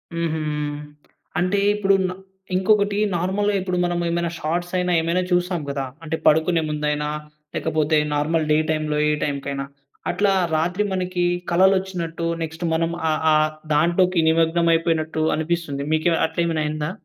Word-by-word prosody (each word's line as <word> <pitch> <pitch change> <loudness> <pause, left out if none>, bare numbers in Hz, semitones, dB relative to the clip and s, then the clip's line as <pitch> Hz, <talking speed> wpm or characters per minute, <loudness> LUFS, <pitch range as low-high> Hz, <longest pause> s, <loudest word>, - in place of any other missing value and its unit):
హుహు. 165 -1 -1 1.0
అంటే 185 +3 +1 0.2
ఇప్పుడు 195 -1 +3
న - - -3 0.4
ఇంకొకటి 200 +2 +2 0.2
నార్మల్‌గా 200 +4 0
ఇప్పుడు 180 -1 -2
మనం 175 0 -1
ఏమైనా 170 0 0
షార్ట్స్ 175 +3 -2
అయినా 180 0 0
ఏమైనా 170 +3 0
చూస్తాం 180 -1 +1
కదా! 140 -1 -2 0.2
అంటే, 160 0 -2
పడుకునే 160 +2 +4
ముందైనా 150 0 -1 0.5
లేకపోతే, 155 -1 +1 0.2
నార్మల్ 155 +2 +1
డే 150 - +5
టైమ్‌లో 155 -1 0
ఏ - - +3
టైమ్‌కైనా. 140 -1 -3 0.5
అట్లా 200 -1 +2 0.2
రాత్రి 175 +6 0
మనకి 180 -1 -1 0.3
కలలొచ్చినట్టు 180 -2 +1 0.2
నెక్స్ట్ 160 +2 -6
మనం 165 +1 0 0.2
ఆ, - - +3 0.2
ఆ, - - +5 0.4
దాంట్లోకి 175 +3 +3
నిమగ్నం 165 +1 +2
అయిపోయినట్టు 160 -1 0
అనిపిస్తుంది. 160 -3 -2
మీకు 160 +2 +2 0.2
అట్లాయేమైన 165 -1 -1
అయిందా? 150 +1 -2
165 Hz, 135 wpm, -22 LUFS, 155-180 Hz, 1.0 s, డే